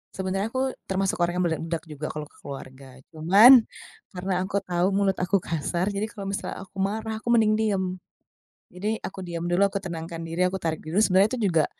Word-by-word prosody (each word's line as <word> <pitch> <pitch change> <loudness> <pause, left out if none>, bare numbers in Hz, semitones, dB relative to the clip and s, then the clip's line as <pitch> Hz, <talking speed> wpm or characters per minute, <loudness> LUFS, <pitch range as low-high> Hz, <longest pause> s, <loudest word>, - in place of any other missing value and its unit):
Sebenarnya 195 +4 -2
aku 260 0 -1
termasuk 190 0 -1
orang 175 - -3
yang - - +2
meledak 165 0 -3
juga 150 0 -6
kalau 150 -1 -6
ke - - -25
keluarga, 130 -1 -10
cuman 205 +10 +7 0.5
karena 185 +1 -3
aku 200 +1 -1
tahu 180 +1 0
mulut 195 -1 +1
aku 185 +1 +1
kasar, 170 +4 -1
jadi 200 +1 -2
kalau 205 -3 -7
misalnya 195 - -4
aku 195 0 -13
marah 220 +3 -2
aku 235 +2 0
mending 215 -2 +4
diem. 210 -3 +1 0.9
Jadi 210 +5 -2
aku 190 - -6
diem 170 -1 -4
dulu, 175 +3 +2
aku 200 0 -2
tenangkan 165 -2 -6
diri, 165 +2 -1
aku 190 +1 -2
tarik 160 -1 -1
dulu. 165 +5 -1
Sebenarnya 195 +1 +4
itu 250 - -3
juga 160 -3 +3
190 Hz, 195 wpm, -25 LUFS, 165-200 Hz, 0.9 s, cuman